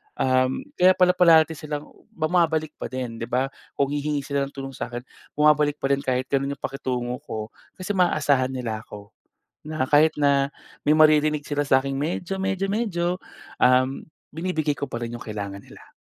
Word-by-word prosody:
um, 130 0 +1 0.2
kaya 185 +1 +6
pala 180 0 +5
parati 165 -3 +6
silang 150 0 -6 0.3
bumabalik 160 -1 +1
pa - - -4
din 125 -3 -5
'di 115 - -4
ba. 130 +2 0 0.2
Kung 140 0 0
hihingi 145 -1 -1
sila 140 -1 -1
ng - - -15
tulong 135 0 -6
sa'kin, 120 0 -5 0.3
bumabalik 150 -1 +4
pa 135 - 0
rin 140 - +3
kahit 130 -1 -1
gano'n 140 0 0
'yong - - -35
pakitungo 125 -2 -3
ko 110 +1 -5 0.2
kasi 185 +2 -4
maaasahan 145 -7 +2
nila 115 -4 -3
ako. 105 +1 -11 0.6
Na 155 -4 -2
kahit 150 +2 +5
na 140 -1 +3 0.4
may - - +6
maririnig 155 -1 +4
sila 145 0 0
sa 130 -1 +5
akin 135 0 -3
medyo 170 +6 -2
medyo 195 0 -1
medyo, 205 -6 -1 0.6
um, 130 +1 +3 0.3
binibigay 160 -2 -1
ko 140 - -4
pa 120 - -3
rin 120 0 -5
'yong 120 - -8
kailangan 100 -2 -6
nila. - - -16
140 Hz, 175 wpm, -24 LUFS, 130-155 Hz, 0.6 s, kaya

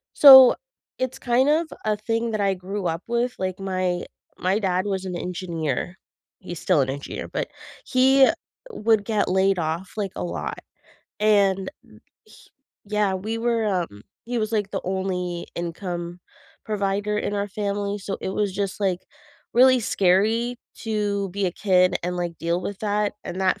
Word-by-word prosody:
So, 265 -3 +10 0.4
it's 255 +1 -2
kind 245 +2 +2
of 315 +3 +2 0.2
a 215 -1 +2
thing 225 +2 -2
that 215 - -1
I 195 -1 +2
grew 185 +1 -4
up 165 +2 -3
with, 240 +1 0
like, 185 0 -3
my 185 -2 -1 0.4
my 190 +3 +1
dad 185 -2 0
was 190 -2 -2
an 180 - -4
engineer. 175 -3 -3 0.4
He's 175 -3 -7
still 180 -6 +3
an 135 - -1
engineer, 140 +1 -5
but - - -3 0.4
he 265 +1 +5 0.4
would 220 - +2
get 215 -1 0
laid 190 +1 +3
off, 165 +3 -3
like, 200 -3 -2
a - - -4
lot, 175 - -4 0.6
and, 200 -2 +3
m - - -19 0.3
h - - -18 0.4
Yeah, 210 -2 0
we 215 +5 -3
were, 230 -1 +1
um 175 - -2 0.2
he 240 +1 -2
was, 215 0 -2
like, 205 -3 0
the - - -2
only 180 -2 -2
income 175 0 -5 0.4
provider 205 0 -1
in 205 - -2
our 200 0 -1
family, 205 0 -2
so 195 0 -4
it - - -3
was 200 0 -1
just, 200 0 -3
like, 185 -3 0 0.5
really 255 +1 +6
scary 220 +5 +2 0.2
to 205 -3 -1
be 200 +1 -1
a 175 - -2
kid 185 -1 +3
and, 180 +1 -2
like, 175 -2 -3
deal 170 +2 -1
with 205 - -5
that, 210 -1 0
and 185 - -5
that 190 +1 +1
195 Hz, 170 wpm, -24 LUFS, 180-215 Hz, 0.6 s, So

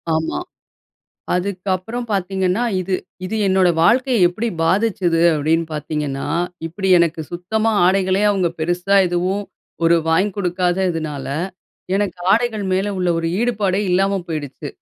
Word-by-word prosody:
ஆமா. 160 - -1 1.0
அதுக்கப்புறம் 190 +5 -2
பாத்தீங்கன்னா? 190 +1 0 0.2
இது, 185 +1 -2 0.3
இது 215 +4 -3
என்னோட 190 -1 +3
வாழ்க்கைய 235 0 +4
எப்படி 215 +7 -3 0.2
பாதிச்சது 185 -2 +1
அப்படின்னு 160 +3 +1
பாத்தீங்கன்னா? 150 -2 -3 0.4
இப்படி 190 +4 -3
எனக்கு 170 -1 +1
சுத்தமா 215 +6 0 0.2
ஆடைகளே 190 +1 +2
அவங்க 190 -4 +1
பெருசா 175 +4 +1
எதுவும் 180 +3 -1 0.4
ஒரு 170 +1 +5
வாங்கி 185 +6 +2
குடுக்காததுனால, 175 -5 -1 0.7
எனக்கு 200 -2 -2
ஆடைகள் 220 -1 +1
மேல 195 +2 0
உள்ள 180 -1 0
ஒரு 165 - -1
ஈடுபாடே 205 -5 0
இல்லாம 195 +2 +2
போயிடுச்சு. 145 -2 -5
185 Hz, 115 wpm, -19 LUFS, 170-200 Hz, 1.0 s, ஒரு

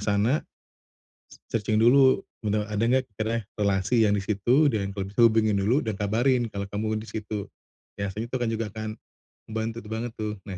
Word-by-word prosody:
sana 105 +8 +1 1.1
Searching 110 -1 0
dulu, 130 +4 +5 0.2
benar 105 -1 0
ada 105 - -1
enggak 130 +2 +3 0.2
kiranya 115 0 -1
relasi 100 +3 +2
yang 105 -1 +3
di 100 - -2
situ, 120 +9 +3
dan 100 -2 -2
kalau 95 - -2
bisa 105 +4 -2
hubungin 110 -2 +4
dulu, 120 +9 +2
dan 110 -3 -2
kabarin 120 +4 +1
kalau 100 -1 -4
kamu 110 +2 -2
di 110 - -10
situ. 105 -2 -5 0.5
Biasanya 100 +3 -3
itu 130 - -1
kan 120 - 0
juga 115 0 -1
akan 110 0 -5 0.6
membantu 110 +1 -3
tu 105 - -12
banget 115 +1 -3
tuh. 105 -1 -2
Nah, 95 -3 -6
110 Hz, 180 wpm, -26 LUFS, 105-115 Hz, 1.1 s, dulu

